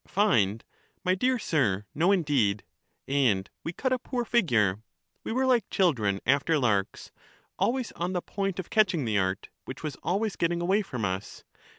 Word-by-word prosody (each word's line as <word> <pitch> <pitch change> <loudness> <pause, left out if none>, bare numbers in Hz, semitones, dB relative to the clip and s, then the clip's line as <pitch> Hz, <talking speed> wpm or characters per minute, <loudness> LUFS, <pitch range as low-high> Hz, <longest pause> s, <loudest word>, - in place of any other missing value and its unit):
Find! 115 - +2 0.4
my 185 - +2
dear 250 +7 +1
sir, 110 - 0
no 170 +6 +3
indeed. 140 - +1 0.4
And 120 -9 +2 0.2
we 165 - -3
cut 255 +8 -1
a 255 - 0
poor 245 0 -3
figure; 115 - +2 0.4
we - - -4
were 260 +3 +1
like 245 -5 +2
children 115 - +1
after 140 +5 +3
larks, 105 -8 -1 0.5
always 250 0 0
on 175 +2 -3
the 180 - -1
point 195 -2 -3
of 185 - -6
catching 185 - +3
the 105 -3 +1
art, 95 0 -2 0.2
which 130 - -8
was 150 -3 -4
always 205 +3 -1
getting 170 0 0
away 190 +5 +2
from 125 - -4
us. 95 +1 -4
165 Hz, 170 wpm, -27 LUFS, -, 0.5 s, no